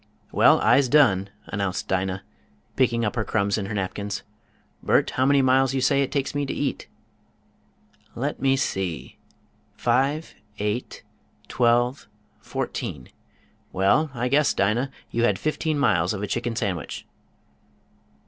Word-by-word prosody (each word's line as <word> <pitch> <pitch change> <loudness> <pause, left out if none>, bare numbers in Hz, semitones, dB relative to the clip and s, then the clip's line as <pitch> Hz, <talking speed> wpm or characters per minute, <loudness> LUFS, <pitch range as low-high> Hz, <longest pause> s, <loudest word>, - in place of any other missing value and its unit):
"Well, - - +5
I'se 135 -2 +4
done," 105 -10 +4 0.2
announced 100 -2 -3
Dinah, 95 0 -1 0.5
picking 120 -3 +2
up 105 - -2
her 110 - 0
crumbs 100 -1 0
in 100 - -4
her 105 - -5
napkins. 100 +1 -3 0.6
"Bert, - - +2
how 130 +1 +1
many 140 -1 +4
miles 130 0 +3
you - - +1
say 140 +2 +3
it 135 - -1
takes 140 -1 -1
me 145 0 -1
to 135 - -3
eat?" 145 - -3 1.3
"Let - - -3
me 135 0 +3
see! 95 - -3 0.6
Five, 135 +6 0 0.2
eight, 105 +4 -3 0.4
twelve, 120 +1 +1 0.3
fourteen: 60 - -5 0.6
well, 100 +12 +2
I 120 +1 -1
guess 140 +2 +2
Dinah, 110 +7 +1 0.2
you 115 - -1
had - - +2
fifteen 155 0 -1
miles 100 - +2
of 100 - -5
a - - -2
chicken 120 +2 -2
sandwich." 100 -8 -3
120 Hz, 140 wpm, -24 LUFS, 100-135 Hz, 1.3 s, Well